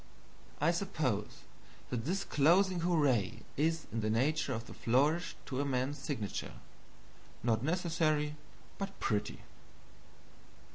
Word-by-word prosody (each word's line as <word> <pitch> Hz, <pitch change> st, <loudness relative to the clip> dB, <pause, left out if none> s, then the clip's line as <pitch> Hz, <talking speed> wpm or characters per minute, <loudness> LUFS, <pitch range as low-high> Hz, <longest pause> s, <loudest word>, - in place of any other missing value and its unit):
I 155 Hz, +4 st, +4 dB
suppose 155 Hz, -, -1 dB, 0.5 s
that 120 Hz, -2 st, -2 dB
this 195 Hz, +5 st, 0 dB
closing 175 Hz, +5 st, +4 dB
hurrah 145 Hz, -, +3 dB, 0.3 s
is 160 Hz, +2 st, +1 dB
in 115 Hz, -, -1 dB
the 110 Hz, -, 0 dB
nature 140 Hz, +6 st, +1 dB
of 115 Hz, -2 st, -3 dB
the -, -, -10 dB
flourish 145 Hz, +9 st, +2 dB
to 130 Hz, 0 st, -2 dB
a -, -, +1 dB
man's 135 Hz, +1 st, -1 dB
signature 120 Hz, -10 st, -3 dB, 0.9 s
not 110 Hz, -2 st, +2 dB
necessary, 155 Hz, -2 st, +1 dB, 0.4 s
but 195 Hz, 0 st, -5 dB
pretty. 105 Hz, -3 st, -1 dB
150 Hz, 115 wpm, -33 LUFS, 125-165 Hz, 0.9 s, I